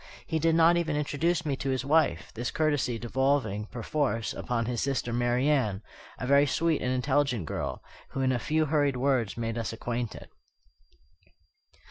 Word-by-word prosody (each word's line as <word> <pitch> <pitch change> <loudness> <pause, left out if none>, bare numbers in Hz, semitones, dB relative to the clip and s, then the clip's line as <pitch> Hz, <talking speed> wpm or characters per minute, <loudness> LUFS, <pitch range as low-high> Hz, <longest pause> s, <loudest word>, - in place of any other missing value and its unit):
He 160 -1 -1
did 165 +1 +3
not 165 +1 +5
even 165 -3 0
introduce 160 +3 0
me 145 -3 0
to 135 - -3
his 130 0 -1
wife; 140 - +2
this 120 +1 -3
courtesy 145 -6 0
devolving, 120 -3 0
perforce, 120 -1 -2
upon 115 -2 -2
his 120 -1 -2
sister 130 -3 -1
Marian, 120 -3 +1 0.3
a - - -4
very 140 +2 +5
sweet 165 +3 +1
and 125 - 0
intelligent 130 - +1
girl, 70 -3 -4 0.3
who 135 - -3
in 130 0 +2
a 125 - 0
few 155 +6 +1
hurried 145 -3 +1
words 125 -5 0
made 115 0 -2
us 115 - -3
acquainted. 120 0 -4
130 Hz, 160 wpm, -28 LUFS, 120-150 Hz, 0.3 s, not